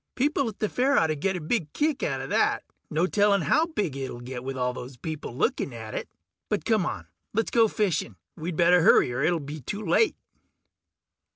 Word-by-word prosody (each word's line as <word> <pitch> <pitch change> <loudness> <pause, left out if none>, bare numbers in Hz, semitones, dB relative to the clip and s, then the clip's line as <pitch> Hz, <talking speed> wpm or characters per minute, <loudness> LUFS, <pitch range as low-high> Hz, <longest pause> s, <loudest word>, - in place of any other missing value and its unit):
People 280 -1 +1
at 210 - -10
the 215 - 0
fair 265 +6 +2
oughtta 160 -1 +3
get 190 +6 -1
a - - -2
big 160 -1 -1
kick 300 -2 0
outta - - -1
that. - - +1 0.3
No 160 +3 +1
telling 200 0 +3
how 305 - +3
big 210 - -2
it'll 130 -3 -5
get 125 0 -7
with 135 0 -4
all 125 0 0
those 125 +1 -8
people 155 -3 -6
looking 130 - 0
at 110 -1 -7
it. - - -4 0.4
But 210 - -1
come 215 -6 +2
on, - - -4 0.3
let's 225 - 0
go 230 -2 +5
fishing. 180 - -1 0.2
We'd 165 +2 -4
better 175 0 +5
hurry 125 -6 +5
or 125 - -2
it'll 165 +3 +2
be 150 +1 -7
too 205 - -5
late. 190 - +3
170 Hz, 200 wpm, -26 LUFS, 135-215 Hz, 0.4 s, go